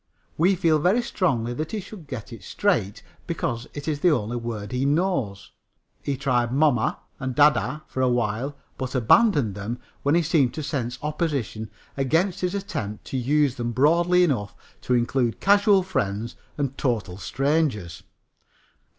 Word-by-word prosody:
We 180 +5 +3
feel 165 -4 +3
very 195 +10 +3
strongly 120 - 0
that 155 - -4
he 215 - -1
should 195 -4 -10
get 125 -3 -7
it 115 - -10
straight, 130 - 0 0.2
because 115 0 -2
it 145 +1 -6
is 150 -2 -1
the 180 - +4
only 120 -6 0
word 115 -3 -4
he 125 +1 -1
knows. 140 - 0 0.5
He 140 -2 -2
tried 125 -4 +1
"moma" 135 -3 +2 0.2
and 130 -2 -3
"dayday" 150 +1 +3
for 130 - -4
a 130 - +3
while, 120 +4 -1 0.2
but 130 0 -4
abandoned 130 - +4
them 105 +5 -4 0.2
when 145 +3 +2
he 170 - +3
seemed 150 -6 +2
to 155 - -4
sense 125 -4 -3
opposition 145 - -2 0.3
against 165 +8 +1
his 180 +1 -1
attempt 150 - -4
to 135 - -3
use 140 +2 +2
them 120 -1 -3
broadly 170 +7 +4
enough 120 - 0 0.3
to 125 - +1
include 120 0 0
casual 200 -1 +5
friends 115 - -2 0.2
and 140 -2 -2
total 110 -8 -1
strangers. 115 - -1
135 Hz, 160 wpm, -24 LUFS, 120-160 Hz, 0.5 s, casual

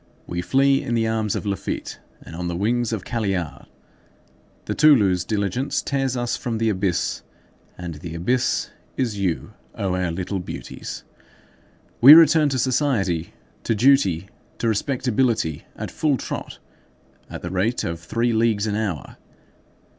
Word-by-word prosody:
We 90 0 -3
flee 135 +7 +3
in 120 -4 -2
the 115 -1 +1
arms 110 -2 -1
of - - -4
Laffitte 100 -1 -4 0.2
and - - -10
on 90 +1 -4
the 85 - -3
wings 115 +5 0
of 110 -5 -3
Caillard. 95 -9 -3 1.0
The - - -2
Toulouse 105 - +4
diligence 105 +7 -1
tears 135 -2 -1
us 120 -1 -1
from 115 -2 -3
the 115 0 +1
abyss, 95 -3 -1 0.6
and 90 -2 -6
the 80 +2 -8
abyss 120 +10 0 0.3
is 115 -6 -1
you, 90 -4 -2 0.2
O 95 -2 -1
our 90 -1 0
little 90 +3 -3
beauties! 90 - -7 1.0
We 140 +6 +12
return 160 -2 +6
to 135 - -1
society, 120 - 0 0.3
to 115 - 0
duty, 100 - +3 0.3
to 115 - -1
respectability, 115 - 0
at - - -6
full 150 -4 +1
trot, - - -6 0.7
at - - -8
the - - -4
rate 100 +6 0
of 85 0 -3
three 115 +8 -1
leagues 110 -2 +2
an 105 - -1
hour. 105 -7 -3
110 Hz, 145 wpm, -23 LUFS, 90-125 Hz, 1.0 s, We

